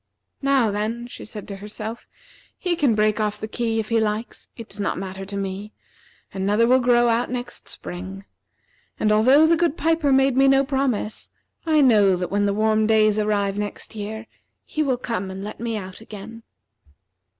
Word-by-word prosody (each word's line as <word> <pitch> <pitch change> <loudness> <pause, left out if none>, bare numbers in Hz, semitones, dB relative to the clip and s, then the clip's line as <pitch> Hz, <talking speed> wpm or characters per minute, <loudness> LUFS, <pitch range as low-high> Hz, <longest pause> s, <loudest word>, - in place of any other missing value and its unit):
"Now, 270 -5 +3
then," 220 +4 -2
she 245 - -10
said 210 -1 -8
to 200 - -6
herself, 215 +3 -7 0.5
"he 360 -1 -1
can 280 -9 +2
break 215 0 +2
off 210 -1 -1
the 215 - -4
key 225 0 -1
if 215 - -3
he 230 -1 +3
likes. 220 +1 -3
It 230 -2 -8
does 205 - -9
not 200 - -1
matter 190 +1 -6
to 200 0 -5
me. 195 +2 -5 0.6
Another 205 +4 +2
will 255 +2 +5
grow 240 -1 +4
out 235 +1 +1
next 245 0 -5
spring. 90 +2 -7 0.7
And 215 - +2
although 255 +9 +6
the 330 +1 +4
good 330 -1 0
piper 320 -3 +2
made 270 -1 +4
me 270 +1 +5
no 270 0 +5
promise, 265 -6 -2 0.4
I 310 -2 +4
know 210 -8 +5
that 180 0 -4
when 205 0 +2
the 200 - +1
warm 215 0 +2
days 215 -1 +4
arrive 205 -1 0
next 205 +2 -5
year, 220 +1 -6 0.4
he 310 - -3
will 265 -4 +1
come 230 -6 -3
and 190 +1 -6
let 210 - -7
me 230 -1 -2
out 190 0 -8
again." 220 +1 -10
220 Hz, 185 wpm, -23 LUFS, 205-245 Hz, 0.7 s, although